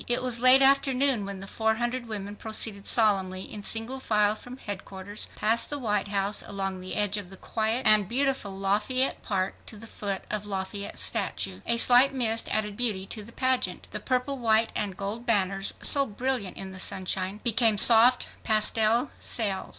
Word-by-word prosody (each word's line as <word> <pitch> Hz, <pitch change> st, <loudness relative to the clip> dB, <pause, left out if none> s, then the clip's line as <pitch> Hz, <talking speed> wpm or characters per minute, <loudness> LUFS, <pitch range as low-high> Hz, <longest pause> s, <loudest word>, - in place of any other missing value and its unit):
It 245 Hz, +1 st, +1 dB
was 240 Hz, -2 st, +2 dB
late 255 Hz, +2 st, +7 dB
afternoon 270 Hz, -4 st, +2 dB
when 195 Hz, -1 st, -7 dB
the 195 Hz, -, -8 dB
four 220 Hz, +2 st, -1 dB
hundred 240 Hz, +1 st, -3 dB
women 205 Hz, -2 st, -6 dB
proceeded 215 Hz, -2 st, -1 dB
solemnly 190 Hz, -4 st, +1 dB
in 210 Hz, -, -9 dB
single 225 Hz, +5 st, -3 dB
file 210 Hz, -4 st, +1 dB
from 245 Hz, +4 st, -11 dB
headquarters, 200 Hz, -2 st, -6 dB
past 225 Hz, +2 st, +1 dB
the 290 Hz, -, -2 dB
White 210 Hz, -6 st, -2 dB
House, 200 Hz, 0 st, 0 dB
along 195 Hz, -1 st, -4 dB
the 185 Hz, 0 st, -7 dB
edge 205 Hz, 0 st, 0 dB
of 200 Hz, -3 st, -6 dB
the 190 Hz, -, -10 dB
quiet 225 Hz, +6 st, -2 dB
and 215 Hz, -3 st, +5 dB
beautiful 270 Hz, -3 st, 0 dB
Lafayette 210 Hz, +7 st, 0 dB
Park, 190 Hz, -2 st, -3 dB
to 220 Hz, -, -4 dB
the 220 Hz, -, -10 dB
foot 200 Hz, -3 st, -5 dB
of 210 Hz, -1 st, -3 dB
Lafayette's 200 Hz, 0 st, -4 dB
statue. 95 Hz, 0 st, -1 dB
A 235 Hz, -, +2 dB
slight 250 Hz, +3 st, +5 dB
mist 225 Hz, -3 st, +1 dB
added 210 Hz, -1 st, -2 dB
beauty 210 Hz, -5 st, -2 dB
to 215 Hz, +2 st, -7 dB
the 225 Hz, -, -13 dB
pageant. 260 Hz, +1 st, -1 dB
The -, -, -5 dB
purple, 260 Hz, +1 st, -2 dB
white 225 Hz, -1 st, +2 dB
and 195 Hz, -3 st, -2 dB
gold 210 Hz, +5 st, -5 dB
banners, 195 Hz, -3 st, +1 dB
so 275 Hz, -1 st, +6 dB
brilliant 245 Hz, -2 st, -3 dB
in 190 Hz, 0 st, -7 dB
the 185 Hz, -, -10 dB
sunshine, 190 Hz, +1 st, -3 dB
became 230 Hz, -2 st, +2 dB
soft 235 Hz, +4 st, +6 dB, 0.2 s
pastel 220 Hz, +3 st, +3 dB
sails. 200 Hz, -5 st, -2 dB
215 Hz, 180 wpm, -26 LUFS, 200-245 Hz, 0.2 s, late